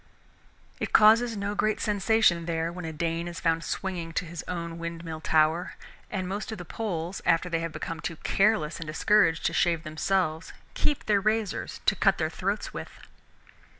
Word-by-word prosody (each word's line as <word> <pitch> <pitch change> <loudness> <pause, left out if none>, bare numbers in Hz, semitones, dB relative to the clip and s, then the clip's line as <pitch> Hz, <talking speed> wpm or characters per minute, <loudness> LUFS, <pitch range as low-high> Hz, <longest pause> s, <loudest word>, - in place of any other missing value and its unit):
It - - -3
causes 225 +1 +6
no 200 +1 -2
great 215 +1 +1
sensation 205 -4 +2
there 165 0 -1
when 180 0 -7
a 160 - -4
Dane 165 +2 -2
is 170 -1 -6
found 165 -1 +1
swinging 175 -4 -4
to 175 - -1
his 170 -1 -7
own 170 -2 -4
windmill 165 -1 -5
tower, 160 +3 +2 0.3
and 185 -3 -3
most 200 +4 -4
of 220 - -5
the 175 - -8
Poles 180 -3 -4
after 175 +1 +2
they 165 -1 0
have 165 0 -3
become 165 +1 -5
too 165 - -4
careless 195 -3 +1
and 165 - -6
discouraged 165 +1 +3
to - - +1
shave 170 -2 +2
themselves 160 0 -1 0.2
keep 295 - 0
their 205 -2 +3
razors 215 -1 -1
to - - +4
cut - - +3
their - - -1
throats - - -2
with. - - -6
170 Hz, 180 wpm, -27 LUFS, 165-200 Hz, 0.3 s, causes